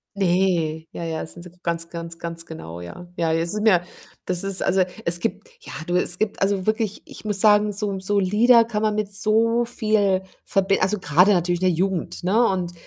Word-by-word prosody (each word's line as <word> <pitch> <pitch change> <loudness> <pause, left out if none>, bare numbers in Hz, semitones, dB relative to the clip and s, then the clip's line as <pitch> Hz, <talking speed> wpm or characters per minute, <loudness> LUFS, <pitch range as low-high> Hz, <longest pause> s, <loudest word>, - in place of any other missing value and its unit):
Ne, 175 -4 +1
ja, 170 - -6
ja, 160 -1 -3
da - - -4
sind 170 +2 -13
sie 180 - -11
ganz 170 -1 -2
ganz 170 0 -7
ganz 165 -1 -6
genau, 85 - -9
ja. 130 - -10
Ja, 165 -1 +1
es 165 +1 -1
sind 210 +1 -1
ja 180 -4 +5 0.4
das 180 0 0
ist 195 -1 -1
also, 190 0 +2 0.2
es 170 +1 +2
gibt, 230 - -3
ja - - -10
du, 175 - 0
es 180 0 0
gibt 215 -1 -1
also 195 0 0
wirklich 215 -2 -1
ich - - -13
muss 205 -2 0
sagen, 210 -1 +5
so 200 -1 -3
so 200 +2 0
Lieder 225 +5 +5
kann 220 -2 -3
man 215 -1 +2
mit 210 -1 -2
so 225 +3 +2
viel 215 -5 +1 0.2
verbin 195 0 +1
also, 195 +2 +1
grade 180 +7 +4
natürlich 175 -1 0
in 185 - +3
der 180 - +2
Jugend, 185 -1 -2
ne? 220 +6 +3
Und 180 -2 -2
190 Hz, 215 wpm, -23 LUFS, 170-210 Hz, 0.4 s, ja